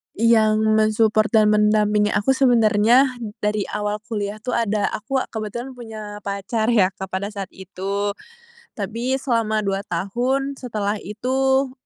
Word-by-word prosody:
Yang 220 -1 +4 0.2
men-support 215 0 +3
dan 215 -2 +4
mendampingi 210 0 +3
aku 210 +4 +1
sebenernya 240 -2 +4 0.4
dari 210 -1 0
awal 210 0 -3
kuliah 210 -2 -3
tuh 250 +3 -3
ada 215 -3 +1
aku 265 +6 -2
kebetulan 235 +4 -6
punya 215 -3 -8
pacar 205 +3 -1
ya 205 -5 +4
Kak 190 0 -7
pada 190 +2 -2
saat 200 -2 -7
itu. 200 +2 -4 0.6
Tapi 230 +5 -2
selama 230 -5 0
2 195 0 -2
tahun 250 +10 -1
setelah 215 -4 -2
itu, 265 +6 0
215 Hz, 130 wpm, -22 LUFS, 205-235 Hz, 0.6 s, Yang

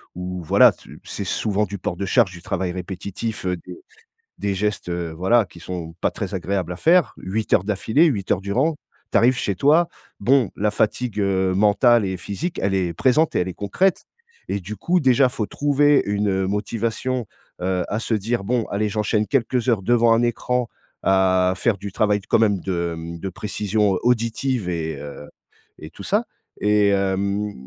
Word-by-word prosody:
où, 90 0 -5
voilà, - - +6
c - - -18
c'est - - -5
souvent 105 0 0
du 100 0 -6
port 90 - -3
de 100 - -2
charge, 105 -2 +3
du 90 - -11
travail 95 0 -2
répétitif, 95 +4 -5
heu, 90 -1 0
des 360 - -11 0.6
des 100 -1 -1
gestes, 105 -1 -2
heu, 85 -1 -3
voilà, 105 +7 +3
qui 90 - -15
sont 85 -3 -6
pas - - +2
très - - -5
agréables 95 -2 -2
à - - -7
faire, 170 - +3
8 105 +4 -3
heures - - +4
d'affilée, 110 - +2
8 105 - 0
heures 90 - +1
durant 130 +12 0 0.4
tu - - +3
arrives 125 +1 +3
chez 100 -5 -1
toi, 155 - +4 0.3
bon, 125 +1 +3
la 105 +1 +1
fatigue, 110 +1 -1
heu, 95 -2 +1
mentale 105 +4 +4
et 95 -1 -3
physique, 145 - -4
elle 100 0 0
est 90 -3 0
présente 140 - +2
et - - +3
elle 90 - 0
est 90 - -4
concrète 175 - 0 0.4
et 100 - -2
du 100 +3 -7
coup, 180 - +1
déjà, 130 -3 +4
il 125 - +2
faut 115 -5 -2
trouver 145 0 +3
une, 105 0 0
heu, 95 -1 0
motivation, 115 +4 -2 0.4
heu, 90 0 0
à 105 - -2
se 115 - -2
dire: 110 +1 -1
«Bon 120 +2 0
allez, 105 +1 -1
j'enchaîne 105 +1 0
quelques 125 0 0
heures 110 -5 +2
devant 120 +2 +4
un 115 - +3
écran 120 +1 0 0.4
à 95 -1 +3
faire 110 -2 +1
du 100 -1 -6
travail 105 0 +1
t 95 - -19
quand - - +4
même 105 -3 +2
de, 85 -2 -2
mmh, 85 +1 -7
de 95 - -4
précision 105 +1 -1
auditive 120 -2 0
et 80 -3 -3
heu 75 0 -9 0.5
et - - -10
tout - - -11
ça» - - +1 0.4
et 105 0 +3
hem 100 +1 0
105 Hz, 195 wpm, -22 LUFS, 95-120 Hz, 0.6 s, voilà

